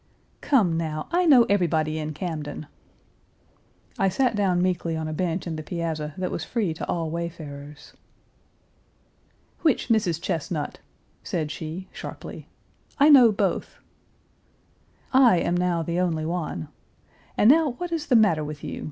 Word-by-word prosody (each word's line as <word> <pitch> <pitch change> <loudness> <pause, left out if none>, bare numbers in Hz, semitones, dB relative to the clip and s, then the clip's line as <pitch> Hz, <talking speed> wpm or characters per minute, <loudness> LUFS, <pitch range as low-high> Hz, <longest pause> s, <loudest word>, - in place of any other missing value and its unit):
"Come, 195 - +2
now, 155 -2 -3
I 355 0 +2
know 260 -6 +8
everybody 160 -6 +1
in 155 -1 -4
Camden." 155 -3 -5 1.3
I 195 - +3
sat 240 +4 +1
down 190 -4 +1
meekly 175 -2 0
on 160 0 -3
a 155 - -4
bench 175 +2 -2
in 165 -3 -4
the - - -4
piazza, 155 -2 -4
that 185 0 -2
was - - -3
free 210 -9 -1
to - - -6
all 165 -2 -1
wayfarers. 150 -3 -7 1.7
"Which 310 -6 +1
Mrs. 205 -8 +2
Chesnut?" 165 -4 -3 0.4
said 155 -4 -3
she 165 +4 -6
(sharply). - - -9 0.5
"I 290 +2 +6
know 255 -6 +8
both." 205 - -2 1.4
"I 255 -7 +6
am 175 - 0
now 175 -2 0
the 170 +2 -2
only 165 -4 0
one. 160 - -3 0.7
And 210 - +4
now 310 -3 +3
what 350 +7 -6
is 325 -3 -2
the 255 - +3
matter 200 -9 +4
with 150 0 -7
you? - - -5
170 Hz, 145 wpm, -25 LUFS, 155-210 Hz, 1.7 s, know